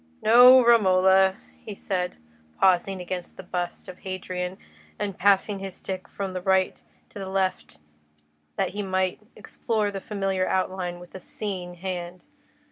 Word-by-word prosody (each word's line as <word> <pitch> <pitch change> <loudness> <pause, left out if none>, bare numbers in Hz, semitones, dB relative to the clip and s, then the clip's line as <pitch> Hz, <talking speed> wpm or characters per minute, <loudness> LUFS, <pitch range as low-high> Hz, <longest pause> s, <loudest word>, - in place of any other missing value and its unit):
"No, 245 +2 +8
Romola," 190 -4 +5 0.3
he 210 - -7
said, 180 -2 -3 0.4
pausing 190 +1 +3
against 180 0 -6
the - - -8
bust 175 -1 -4
of 185 - -10
Hadrian, 185 -1 -5 0.4
and 205 -2 -3
passing 200 +1 +2
his 195 -1 -7
stick 185 -1 -6
from 195 -2 -5
the 185 - -4
right 190 0 +2 0.4
to - - -9
the 190 -1 -5
left 190 - -2 0.8
that - - 0
he 205 - -5
might 185 -1 -1 0.2
explore 215 -3 -2
the 195 -1 -6
familiar 195 -3 -1
outline 185 -2 -2
with 175 0 -14
a 190 - -7
"seeing 185 -2 -6
hand." 180 0 -6
190 Hz, 145 wpm, -25 LUFS, 185-195 Hz, 0.8 s, No